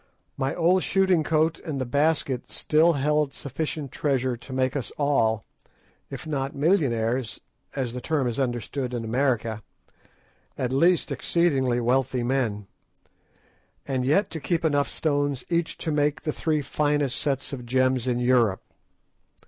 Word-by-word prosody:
My 135 +1 -1
old 180 +2 +3
shooting 190 -4 +2
coat 160 +1 +1
and 155 -5 -5
the 130 - -1
basket 140 -1 0
still 160 +3 +3
held 150 0 +1
sufficient 145 0 -4
treasure 130 -4 0
to 120 +3 -12
make 130 +1 0
us 125 -7 -3
all, 115 -7 +1 0.6
if 135 +1 -7
not 140 -3 -3
millionaires 130 - +1 0.4
as 130 -4 -2
the 125 - -5
term 150 -2 0
is 120 +1 -2
understood 125 0 -2
in 115 -1 -3
America, 115 -3 0 1.0
at 130 0 -1
least 170 +3 +3
exceedingly 135 -4 +1
wealthy 125 +1 +1
men, 120 -5 -1 1.2
and 130 -2 -1
yet 155 +11 +2
to 160 - -3
keep 165 +2 -1
enough 145 -2 +2
stones 145 -4 -1
each 170 -1 0
to 160 - -2
make 150 0 +1
the 155 - -1
three 155 -2 0
finest 145 -1 0
sets 140 -1 -1
of 125 -3 -5
gems 130 0 +1
in 125 -1 +1
Europe. 120 -5 +2
135 Hz, 145 wpm, -25 LUFS, 125-150 Hz, 1.2 s, old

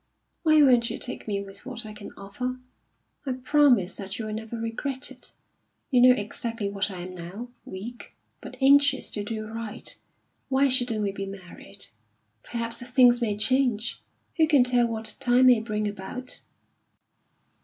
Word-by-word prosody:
Why 310 -2 +5
won't 245 -4 +5
you - - -4
take 250 - -4
me 200 -1 -1
with 195 0 -11
what 250 -3 -7
I 215 - -8
can 210 -1 -10
offer? 250 +6 -4 0.7
I 270 -3 -2
promise 255 -7 +3
that 195 0 -6
you 225 - -4
will 215 - -4
never 220 +1 -5
regret 260 +5 -3
it. 255 - -13 0.6
You 250 -2 +5
know 250 0 +8
exactly 215 0 -4
what 200 +1 -1
I 185 -2 -6
am 185 +1 -7
now 185 +7 -8 0.2
weak, 220 +6 -9 0.3
but - - -10
anxious 280 0 +4
to 205 - -3
do 215 +1 -4
right. 225 0 -5 0.5
Why 270 +1 +3
shouldn't 245 -4 +2
we 200 - 0
be 195 0 -5
married? 195 +1 -8 0.6
Perhaps 230 0 -4
things 245 -1 +5
may 210 -3 0
change. 240 -1 +1 0.4
Who 320 -1 +5
can 290 -5 +5
tell 245 -1 +3
what 220 -2 -4
time 250 +1 +4
may 250 -3 +7
bring 215 -1 -2
about?" 205 +6 -6
230 Hz, 165 wpm, -26 LUFS, 205-255 Hz, 0.7 s, know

